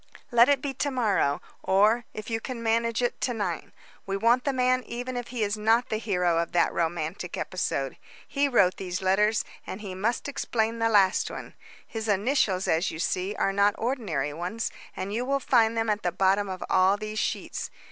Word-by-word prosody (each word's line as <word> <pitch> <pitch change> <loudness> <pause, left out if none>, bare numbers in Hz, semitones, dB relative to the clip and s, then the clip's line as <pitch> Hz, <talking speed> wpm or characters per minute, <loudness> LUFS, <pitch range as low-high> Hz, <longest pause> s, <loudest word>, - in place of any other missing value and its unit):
"Let 240 +2 +6
it 280 -2 +2
be 280 -2 -2
to 285 +2 -1
morrow, 205 - +1 0.2
or, 215 +5 +3
if 215 0 -8
you 225 - 0
can 235 0 -6
manage 230 +1 +1
it, 245 - -1
to 245 - 0
night. 210 - -3 0.4
We 195 0 -1
want 235 +4 +3
the 280 - +2
man 255 -1 +2
even 245 +2 -5
if 245 -1 -4
he 240 -3 -2
is 205 +1 -1
not 225 +3 +3
the 215 - 0
hero 180 -6 +1
of 170 - -2
that 175 - +3
romantic 170 +2 -2
episode. 140 -7 -2 0.3
He 285 +1 +1
wrote 200 -9 +3
these 185 0 -4
letters, 210 +4 +2 0.2
and 190 - -5
he 195 -3 -6
must 220 +9 -1
explain 230 -5 -1
the 225 0 +2
last 200 -3 +3
one. - - -8 0.3
His 225 -1 -5
initials, 205 -2 +1
as 165 +3 +2
you - - -6
see, 185 +4 -1
are 195 - 0
not 200 +1 +3
ordinary 195 - -2
ones, 180 +8 -3 0.3
and 195 +2 -4
you 235 +3 -1
will 275 +2 0
find 230 -3 +3
them 225 0 +1
at 210 -1 0
the 175 - 0
bottom 195 +2 +2
of 185 -1 -5
all 190 +2 +4
these 215 0 -4
sheets. - - -3
215 Hz, 200 wpm, -27 LUFS, 190-235 Hz, 0.4 s, Let